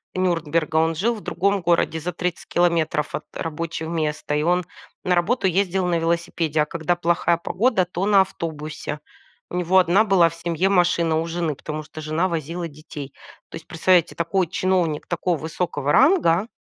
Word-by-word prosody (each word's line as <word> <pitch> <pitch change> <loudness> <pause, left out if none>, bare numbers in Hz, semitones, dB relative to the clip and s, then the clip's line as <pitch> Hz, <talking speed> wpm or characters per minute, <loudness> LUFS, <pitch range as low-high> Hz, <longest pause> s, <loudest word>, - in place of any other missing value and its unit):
Нюрнберга, 165 -3 0
он 160 0 +2
жил 225 +8 +1
в 215 - -8
другом 200 +2 0
городе 170 -1 +1
за 180 +3 -3
30 175 0 -4
километров 170 -4 +1
от - - -4
рабочего 165 0 -4
места, 155 -2 -2
и 150 - +1
он 180 +1 +1 0.4
на 180 - +1
работу 190 +6 +1
ездил 185 0 +1
на 170 -2 +1
велосипеде, 165 -2 0
а - - +2
когда 170 +2 -1
плохая 170 0 +1
погода, 190 +2 +1
то 180 +2 -3
на 200 -2 +5
автобусе. 155 -4 -5 0.5
У - - -6
него 180 +1 +2
1 185 +4 +5
была 190 -5 +4
в 165 - -12
семье 170 +2 -1
машина 170 -3 +2
у 165 - -2
жены, 165 -3 -2
потому 155 +2 -6
что 155 +1 -10
жена 155 +4 0
возила 165 +1 -3
детей. 145 -2 -10 0.4
То - - -10
есть, 165 - -10
представляете, 175 +1 +2
такой 175 +1 0
чиновник 180 -3 0
такого 175 -1 -1
высокого 155 -2 -2
ранга. 235 - +4
170 Hz, 175 wpm, -22 LUFS, 160-180 Hz, 0.5 s, на